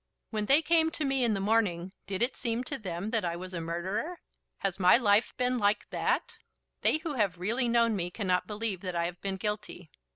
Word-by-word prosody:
When 215 -2 -2
they 290 +4 +5
came 320 0 +3
to 315 -2 -3
me 270 -1 +1
in 225 -3 +2
the - - -2
morning 195 -4 +1
did 200 +3 0
it 255 +2 0
seem 235 +1 -2
to 275 +2 -5
them 190 +1 -4
that 225 -2 +1
I 170 -1 -1
was 185 +1 -7
a 170 - -3
murderer? 185 - -3 0.4
Has 195 -1 -2
my 180 +3 +7
life 215 -2 +3
been 250 0 +1
like 205 0 +1
that? - - -1 0.4
They - - +4
who 315 -1 -5
have 205 -8 0
really 230 +8 0
known 230 -1 +3
me 175 -2 -2
cannot 185 -1 0
believe 210 -3 -2
that 185 -2 -4
I 170 0 +1
have 175 +1 -6
been 195 -1 -2
guilty. 210 -4 -4
210 Hz, 220 wpm, -29 LUFS, 180-240 Hz, 0.4 s, my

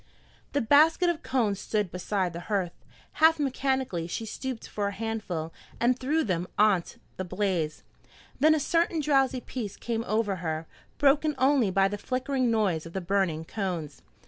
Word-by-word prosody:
The 285 - +2
basket 315 +8 +5
of 330 - -7
cones 220 -7 0
stood 210 -5 -1
beside 185 -1 -1
the 170 - -5
hearth. 190 -5 0 0.5
Half 320 +1 +7
mechanically 265 - -1
she 225 +6 -4
stooped 255 +2 -5
for 205 -1 -2
a - - -2
handful, 195 -7 -4 0.3
and 245 +2 +2
threw 305 +5 +1
them 180 -3 -1
on 210 -4 +5 0.4
the 185 - -2
blaze. 180 -4 -2 0.6
Then 310 +1 +5
a - - +1
certain 330 +2 +1
drowsy 270 -3 +2
peace 220 -7 -6
came 230 -1 -2
over 215 -3 0
her, 160 -2 -3 0.3
broken 290 +2 +3
only 260 -4 +3
by 195 +1 +3
the 205 +1 -4
flickering 255 +2 -1
noise 195 -8 +1
of 165 - -12
the 190 - -1
burning 175 -4 0
cones. 180 -7 -4
215 Hz, 165 wpm, -28 LUFS, 185-265 Hz, 0.6 s, Half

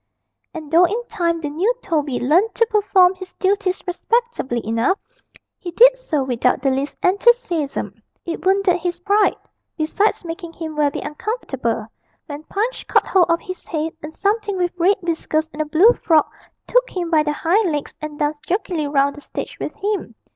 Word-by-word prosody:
And 315 -4 -9
though 340 +2 +6
in 445 +7 -2
time 335 -5 -1
the 295 - -3
new 360 +10 +1
Toby 295 -6 -1
learnt 350 - +2
to 460 - +3
perform 390 -3 +4
his 370 -1 -11
duties 385 -1 0
respectably 375 - -1
enough, 230 - +1 0.6
he 355 - -6
did - - +6
so 320 - -2
without 250 0 0
the 270 - +3
least 270 +2 -2
enthusiasm: 390 - +1 0.2
it 335 - -5
wounded 380 -1 +3
his 350 0 -3
pride 405 +4 +2 0.4
besides 355 +5 0
making 335 0 -7
him 315 -2 -6
very 295 -1 0
uncomfortable 270 - -3 0.4
when 290 -1 -7
Punch 450 +5 -3
caught - - +3
hold 370 -2 +3
of 335 0 +2
his 370 -1 -8
head, 315 0 -2
and 305 +1 -9
something 410 -1 0
with 355 -1 0
red 360 +3 +3
whiskers 320 -2 -1
and 300 - -3
a - - -1
blue 350 +10 +5
frock 320 -9 +2 0.3
took - - +2
him 350 -2 -4
by 315 -2 +5
the 300 0 -1
hind 355 +5 +1
legs, 295 -1 -3
and 305 -1 -6
danced 295 0 -2
jerkily 350 -5 -1
round 280 0 +1
the - - -10
stage - - -6
with - - -5
him. 405 - -3
345 Hz, 175 wpm, -20 LUFS, 300-400 Hz, 0.6 s, though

